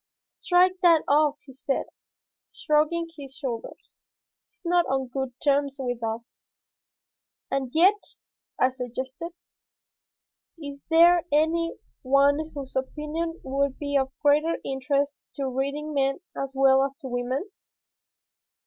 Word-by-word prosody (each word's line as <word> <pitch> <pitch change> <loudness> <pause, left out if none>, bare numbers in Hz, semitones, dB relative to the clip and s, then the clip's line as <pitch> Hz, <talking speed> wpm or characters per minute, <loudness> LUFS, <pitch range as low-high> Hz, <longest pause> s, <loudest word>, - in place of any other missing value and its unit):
"Strike 365 +1 +2
that 335 -3 +5
off," 295 0 +3
he 265 - -13
said, 270 +1 -2 0.7
shrugging 310 +3 +1
his 275 -3 -10
shoulders. 255 -5 -6 0.5
"He 470 - -44
is 375 - -42
not 350 0 +3
on 265 -1 -1
good 265 0 -3
terms 280 -1 +2
with 245 -2 -3
us." 225 +1 -4 1.2
"And 270 -2 -1
yet," 380 +7 +3 0.4
I 255 - +3
suggested, 260 +5 -5 1.3
"is 285 -3 -8
there 340 +1 +6
any 325 +3 +2 0.3
one 280 +3 +3
whose 275 -2 -7
opinion 305 +5 -3
would 275 0 -1
be 285 -1 -3
of 265 -1 +2
greater 300 +3 +3
interest 275 +2 -1 0.2
to 275 -1 -2
reading 280 +4 -3
men 275 +1 +1 0.2
as 275 0 -4
well 270 0 +5
as 275 0 -3
to 270 - -6
women? 255 - -3
280 Hz, 125 wpm, -26 LUFS, 265-315 Hz, 1.3 s, there